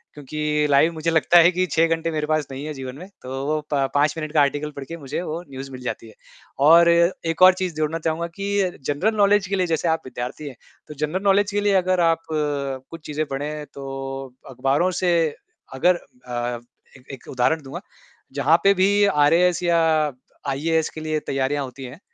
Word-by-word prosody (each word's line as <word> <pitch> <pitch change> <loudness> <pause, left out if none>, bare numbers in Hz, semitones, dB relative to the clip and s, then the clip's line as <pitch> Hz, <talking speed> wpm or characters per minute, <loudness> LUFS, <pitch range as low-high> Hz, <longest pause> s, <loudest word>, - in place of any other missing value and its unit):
क्योंकि 150 +1 -1
लाइव 150 +4 +4
मुझे 160 +1 -1
लगता 165 +2 +4
है 170 - +7
कि 185 +1 0
6 165 +1 +3
घंटे 165 0 -4
मेरे 155 -1 -2
पास 155 -2 +1
नहीं 135 +1 -6
है 155 - -4
जीवन 130 -1 -7
में। 180 +5 -10
तो 135 +2 -5
वो 155 0 0
प 135 -1 +1
पाँच 145 +1 +3
मिनट 155 -1 -4
का 150 - +4
आर्टिकल 145 +1 0
पढ़ 140 - -6
के 165 - -7
मुझे 140 +2 -5
वो 165 -1 -4
न्यूज़ 135 0 -8
मिल 130 -1 -9
जाती 120 -2 -5
है। 110 - -14 0.5
और 170 +1 +7
एक 170 -1 +1
और 185 0 +9
चीज़ 185 -2 -3
जोड़ना 155 +1 -1
चाहूँगा 165 +1 -2
कि 200 -2 -1
जनरल 185 +10 0
नॉलेज 205 -1 +3
के 195 - -1
लिए 180 -1 +1
जैसे 165 +1 -1
आप 160 0 +1
विद्यार्थी 130 +4 -6
हैं, 135 - -8 0.3
तो 150 - -8
जनरल 155 +7 -3
नॉलेज 200 +1 +3
के 205 - 0
लिए 205 -1 +2
अगर 185 0 0
आप 165 -1 +2
कुछ 145 0 -3
चीज़ें 150 +1 -2
पढ़ें 150 +2 -4
तो 135 -1 -7 0.2
अखबारों 135 +7 +1
से 180 - +2 0.6
अगर 175 +7 +3 0.3
अ, 120 -1 -3 0.4
एक 130 - -22
एक 135 - -11
उदाहरण 135 +5 +1
दूँगा। 135 - -7 0.5
जहाँ 145 +4 +3
पे 200 0 +6
भी 200 +2 +3 0.2
आरएएस 175 +3 +3
या 170 -1 +3 0.8
आईएएस 160 +2 0
के 155 - -6
लिए 155 0 -1
तैयारियाँ 135 +1 -1
होती 130 +1 -10
हैं, 130 +6 -10
155 Hz, 200 wpm, -22 LUFS, 135-170 Hz, 0.8 s, और